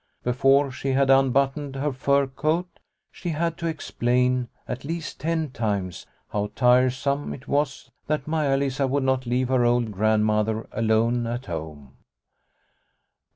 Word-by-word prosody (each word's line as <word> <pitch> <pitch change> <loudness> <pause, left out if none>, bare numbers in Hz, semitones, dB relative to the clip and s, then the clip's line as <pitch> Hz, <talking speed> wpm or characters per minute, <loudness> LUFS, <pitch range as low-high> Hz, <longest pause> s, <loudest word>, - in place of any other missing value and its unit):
Before 135 +3 +3
she 135 +1 -2
had 135 0 +3
unbuttoned 135 +1 +2
her 140 +1 -1
fur 140 +2 +2
coat 155 +6 -2 0.3
she 175 - -6
had 165 +1 -1
to 170 - -2
explain, 125 -5 0 0.2
at 125 +1 -5
least 165 +2 -5
ten 160 -2 -1
times, 100 -7 -3 0.2
how 105 0 -2
tiresome 130 +3 +2
it 130 - -15
was 140 -2 -1 0.2
that 150 -2 -1
Maia 150 -4 +1
Lisa 135 0 0
would 140 +1 0
not 130 -1 0
leave 125 +1 0
her 130 -2 +3
old 120 -2 +2
Grandmother 110 +1 +1
alone 115 +2 +1
at 120 +2 -4
home. 75 -5 -7
130 Hz, 140 wpm, -24 LUFS, 120-140 Hz, 0.3 s, Before